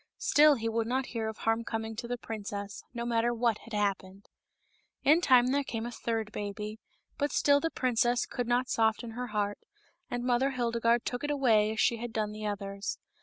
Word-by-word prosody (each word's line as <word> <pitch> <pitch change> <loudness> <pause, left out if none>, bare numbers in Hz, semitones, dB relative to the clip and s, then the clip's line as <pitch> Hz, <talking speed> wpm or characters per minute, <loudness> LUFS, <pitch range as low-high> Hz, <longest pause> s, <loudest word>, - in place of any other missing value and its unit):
Still 300 0 +5
he 230 -3 -3
would 225 0 0
not 260 +2 0
hear 225 -2 -2
of 220 - -7
harm 225 +1 0
coming 225 -1 -4
to 235 - -4
the 245 +1 -2
princess, 205 -3 -6
no 235 -1 -4
matter 235 0 +1
what 230 -2 +1
had 230 - -13
happened. 200 -1 -2 0.7
In 310 +5 +5
time 255 -5 +5
there 285 +1 +2
came 225 -4 -4
a 240 - -4
third 225 -2 -3
baby, 210 +1 -5 0.4
but 290 0 0
still 285 0 +4
the 330 - -1
princess 245 -3 +1
could 245 -2 -4
not 245 +1 +2
soften 225 0 +1
her 250 +2 -4
heart, 205 -2 -2 0.5
and 245 0 -3
Mother 250 +2 +2
Hildegarde 235 -1 +1
took 245 +2 -3
it 290 - -1
away 230 -7 +3
as 220 - -5
she 235 0 +3
had 240 +1 -5
done 215 -2 -1
the 215 0 -5
others. 200 0 -4
230 Hz, 200 wpm, -30 LUFS, 215-245 Hz, 0.7 s, Still